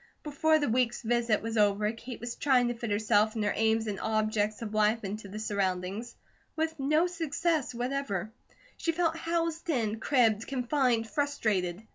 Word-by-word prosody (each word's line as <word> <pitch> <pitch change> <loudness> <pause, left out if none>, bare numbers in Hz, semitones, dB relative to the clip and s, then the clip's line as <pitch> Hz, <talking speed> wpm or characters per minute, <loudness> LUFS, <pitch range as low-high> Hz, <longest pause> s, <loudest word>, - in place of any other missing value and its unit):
Before 310 +1 +2
the 295 - 0
week's 240 0 +1
visit 235 -2 +1
was 225 0 -3
over, 210 0 +3
Kate 235 +2 -9
was 240 0 -4
trying 250 -3 +2
to - - -1
fit 235 -1 -5
herself 210 +1 +2
and 220 - -1
her 205 - +1
aims 220 0 +2
and 205 -3 -3
objects 215 0 0
of 215 -1 -6
life 215 +1 +2
into 205 +1 -5
the 200 +2 -8
surroundings, 200 +2 -2 0.4
with 320 0 0
no 305 +5 +3
success 325 -5 -1
whatever. 245 -5 -2 0.5
She 330 - -1
felt 330 -1 +1
housed 330 0 -2
in, 225 -7 0
cribbed, 225 -5 +2
confined, 250 -3 +1
frustrated. 215 -8 -1
230 Hz, 165 wpm, -29 LUFS, 215-280 Hz, 0.5 s, over